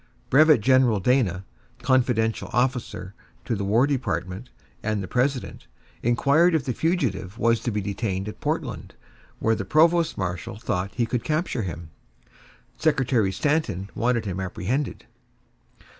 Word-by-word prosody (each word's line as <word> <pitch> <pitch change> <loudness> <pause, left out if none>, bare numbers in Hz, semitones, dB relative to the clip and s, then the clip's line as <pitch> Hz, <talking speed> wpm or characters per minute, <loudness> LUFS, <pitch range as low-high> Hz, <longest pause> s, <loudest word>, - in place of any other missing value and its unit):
Brevet 155 -2 +6
general 125 -2 +4
Dana, 95 -4 +1 0.4
confidential 125 -4 +1
officer 120 -6 -1 0.3
to 120 - -1
the 100 - -3
War 110 +6 +3
Department 110 -5 -3 0.3
and 110 -2 -1
the - - -6
President, 130 +4 -1 0.3
inquired 140 +8 +3
if 145 -5 0
the 125 - -1
fugitive 115 - -1
was 115 -1 +2
to - - -3
be 105 -1 -1
detained 100 -1 -3
at 105 - -8
Portland, - - -3 0.4
where 110 - +1
the 105 -3 -2
provost 165 - +3
marshal 90 +1 -4
thought 100 -4 -2
he 120 - +1
could 120 0 -2
capture 155 -5 -1
him. 85 -4 -6 0.9
Secretary 130 -9 +2
Stanton 110 - -1
wanted 120 -1 0
him 95 -2 -3
apprehended. 105 +9 -3
115 Hz, 135 wpm, -24 LUFS, 100-135 Hz, 0.9 s, Brevet